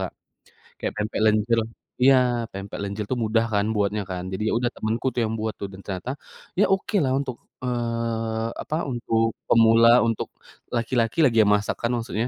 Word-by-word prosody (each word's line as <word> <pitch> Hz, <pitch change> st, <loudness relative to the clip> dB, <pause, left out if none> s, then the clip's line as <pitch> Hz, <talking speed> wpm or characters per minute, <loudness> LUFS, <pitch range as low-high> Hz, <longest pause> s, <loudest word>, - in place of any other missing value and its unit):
Kak. -, -, -4 dB, 0.7 s
Kayak -, -, -3 dB
pempek 105 Hz, +1 st, -2 dB
lenjer 110 Hz, +2 st, +3 dB, 0.4 s
iya, 135 Hz, 0 st, +7 dB, 0.4 s
pempek 100 Hz, +1 st, -6 dB
lenjer 100 Hz, +1 st, -3 dB
itu 130 Hz, -, 0 dB
mudah 115 Hz, +1 st, +2 dB
kan, 100 Hz, 0 st, +2 dB
buatnya 105 Hz, 0 st, 0 dB
kan. 90 Hz, -1 st, -4 dB
Jadi 95 Hz, +3 st, -3 dB
ya -, -, 0 dB
udah 120 Hz, -, 0 dB
temenku 110 Hz, +4 st, -2 dB
tuh, 120 Hz, -, 0 dB
yang 110 Hz, -, -2 dB
buat 110 Hz, 0 st, -2 dB
tuh, -, -, -3 dB
dan 95 Hz, -, -11 dB
ternyata, 95 Hz, +5 st, -4 dB, 0.5 s
ya -, -, +6 dB
okelah 190 Hz, -7 st, 0 dB
untuk 130 Hz, -3 st, -4 dB, 0.3 s
eee, 115 Hz, -2 st, -2 dB
apa? 155 Hz, -, -3 dB, 0.2 s
Untuk 115 Hz, -2 st, 0 dB, 0.2 s
pemula, 115 Hz, 0 st, +6 dB, 0.2 s
untuk 115 Hz, -2 st, -2 dB, 0.5 s
laki-laki 115 Hz, +2 st, 0 dB
lagi 115 Hz, -4 st, +2 dB
yang 105 Hz, -, +4 dB
masak 105 Hz, 0 st, -1 dB
kan, 115 Hz, -, 0 dB
maksudnya. 115 Hz, 0 st, -2 dB
115 Hz, 175 wpm, -24 LUFS, 105-120 Hz, 0.7 s, iya